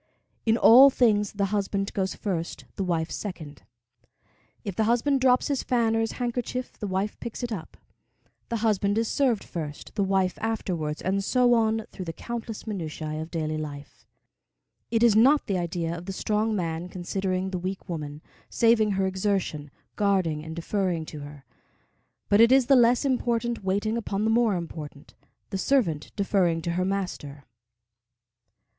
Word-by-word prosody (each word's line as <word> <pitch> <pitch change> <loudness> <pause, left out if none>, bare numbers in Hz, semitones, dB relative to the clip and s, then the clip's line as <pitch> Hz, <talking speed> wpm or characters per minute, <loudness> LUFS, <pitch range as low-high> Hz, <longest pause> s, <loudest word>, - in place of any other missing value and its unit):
In 225 +1 +4
all 255 +4 +9
things 210 -6 +2
the 200 -1 0
husband 200 -1 -1
goes 190 -1 -1
first, 175 -5 -4
the 195 - -2
wife 165 -3 -1
second. 160 -8 -6 1.0
If 200 -3 -5
the 220 - +1
husband 250 +4 +2
drops 255 -1 +4
his 280 -2 0
fan 230 -3 +1
or - - +2
his 225 -1 -1
handkerchief 245 +1 -3
the 210 - -3
wife 195 +2 -2
picks 235 +1 -6
it 240 - -3
up. 180 -7 -6 0.7
The 235 - -1
husband 205 -1 +1
is 225 0 +1
served 245 -7 +1
first, 150 -4 -7
the 205 - 0
wife 190 -2 +1
afterwards, 175 -9 -2
and 195 +1 0
so 245 +3 +3
on 220 -1 +2
through 185 - -7
the 165 - -5
countless 230 +2 -6
minutiæ 155 -6 -4
of 160 - -7
daily 155 -2 -2
life. 145 -2 -8 0.8
It 230 0 +1
is 230 -3 +5
not 270 +7 +5
the 195 -3 -1
idea 170 -1 -2
of 175 +2 -9
the 195 - -3
strong 215 +2 0
man 170 -1 -3
considering 185 +1 -2
the 185 - -2
weak 190 +2 -5
woman, 150 -3 -6 0.3
saving 225 -3 +3
her 190 0 +1
exertion, 190 -6 -1 0.3
guarding 185 -7 +1
and 160 0 -7
deferring 175 -1 -1
to 155 - -8
her; 145 -1 -10 0.8
but 205 +2 +5
it 230 +2 +7
is 265 -1 +5
the 275 - +5
less 245 +2 +4
important 240 -3 0
waiting 205 +4 0
upon 210 -3 -2
the 220 - +2
more 225 -3 +3
important, 155 -3 -7 0.4
the 195 - -2
servant 190 - +1
deferring 190 -5 +1
to 170 - -1
her 180 +2 0
master. 180 -8 -4
195 Hz, 165 wpm, -26 LUFS, 170-225 Hz, 1.0 s, all